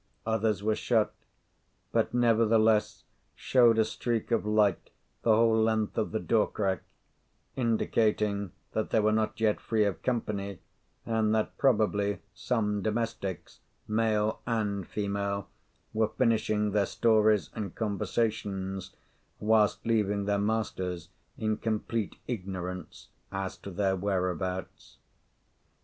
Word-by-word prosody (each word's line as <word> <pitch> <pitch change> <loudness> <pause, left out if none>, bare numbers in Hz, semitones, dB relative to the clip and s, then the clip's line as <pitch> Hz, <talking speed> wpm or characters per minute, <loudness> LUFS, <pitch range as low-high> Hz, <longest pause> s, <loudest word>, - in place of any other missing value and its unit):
Others 110 -2 0
were 110 0 +2
shut, 110 -1 +1 0.8
but, - - +1
nevertheless, 115 -2 +3 0.3
showed 120 -3 +4
a 110 - +4
streak 115 +1 -2
of 115 -2 +1
light 105 -3 +2 0.3
the 110 -2 +4
whole 115 0 +4
length 110 -1 +1
of 110 - -1
the 110 - -1
door 110 -1 +2
crack, 95 -5 -1 0.7
indicating 105 -4 +1 0.2
that 110 - -1
they - - +3
were 110 0 +3
not 110 +1 0
yet 110 -2 +2
free 110 -2 +1
of 95 -5 -2
company, 100 -5 -2 0.5
and 110 -1 +1
that 110 - -1
probably 105 -5 +2 0.2
some 105 0 -1
domestics, 110 -4 -3 0.3
male 110 -1 +1
and 105 -5 -1
female, 100 -1 -2 0.5
were 110 0 +2
finishing 110 -2 +1
their 100 -1 +2
stories 110 -3 +3
and 100 -5 -5
conversations 100 -3 -2 0.4
whilst 105 -1 +2
leaving 105 -3 +1
their 100 0 +1
masters 95 -5 -2 0.3
in 110 -1 0
complete 110 -1 -2
ignorance 90 -5 -5 0.2
as 95 -1 -3
to - - -10
their 95 0 0
whereabouts. 95 -1 -3
105 Hz, 120 wpm, -29 LUFS, 100-110 Hz, 0.8 s, showed